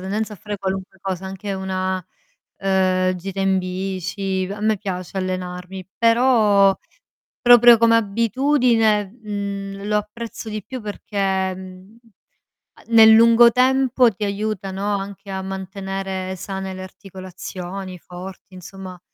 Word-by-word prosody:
tendenza 210 +3 -3
a - - -8
fare 205 +2 -6
qualunque 190 -1 -4
cosa, 190 -1 -4
anche 195 +1 -5
una, 190 -1 -2 0.6
ehm, 185 -1 +1
gita 195 +2 -6
in 195 0 +2
bici, 185 +1 -3
a 205 - -9
me 215 0 +2
piace 185 -1 -5
allenarmi; 185 0 -4
però, 230 -5 +4 0.6
proprio 240 -1 +8
come 230 0 +5
abitudine, 230 0 +2
mhmm, 200 -2 -5
lo 210 0 +2
apprezzo 220 +2 -6
di 215 -1 -5
più 260 +4 -7
perché, 195 -3 -2
mhmm, 185 +3 -12 0.8
a - - -18
nel 225 -1 +7
lungo 230 +1 +7
tempo 255 0 +3
ti 210 0 -7
aiuta, 200 -1 -3
no, 200 +2 -1
anche 200 +1 -8
a 190 0 -4
mantenere 190 0 -5
sane 190 0 -5
le 185 - -8
articolazioni, 185 0 -8
forti; 185 +2 -11
insomma 185 0 -10
195 Hz, 130 wpm, -21 LUFS, 190-215 Hz, 0.8 s, proprio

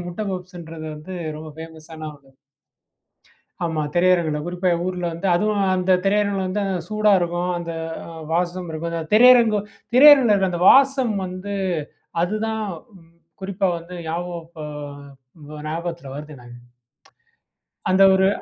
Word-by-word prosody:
முட்ட 175 +3 -7
பப்ஸ்ன்றது 175 -3 -7
வந்து 155 +5 -9 0.2
ரொம்ப 155 +1 -8
ஃபேமஸான 160 -1 -9
ஒண்ணு. 135 -2 -21 1.3
ஆமா 160 -2 -1
திரையரங்குல. 175 -4 +3
குறிப்பா 180 +1 -1 0.2
ஊர்ல 180 -1 -3
வந்து, 170 +4 -4
அதுவும் 205 +2 +1
அந்த 185 +1 +2
திரையரங்குல 200 -1 +1
வந்து 205 +2 -1 0.3
சூடா 215 -1 +2
இருக்கும். 175 +1 -1
அந்த 170 -1 -5 0.6
வாசம் 175 +1 -1
இருக்கும். 160 +1 -4
அந்த 165 -1 -2
திரையரங்கு 235 -2 +6 0.4
திரையரங்குல 270 -5 +8
இருக்கிற 190 -2 +2
அந்த 175 0 -2
வாசம் 265 -4 +4
வந்து 185 +3 -6 0.7
அதுதான் 220 +4 -2 0.4
ம் 165 0 -24 0.3
குறிப்பா 195 0 -1
வந்து 170 +2 -11
ஞாபகம் 170 0 -4 0.9
இப்போ 150 0 -11
ஞாபகத்தில 165 -3 -5
வருது 150 +1 -8
எனக்கு. 120 0 -13 1.3
அந்த 190 +1 +5
ஒரு 190 0 +3
180 Hz, 125 wpm, -22 LUFS, 165-200 Hz, 1.3 s, திரையரங்குல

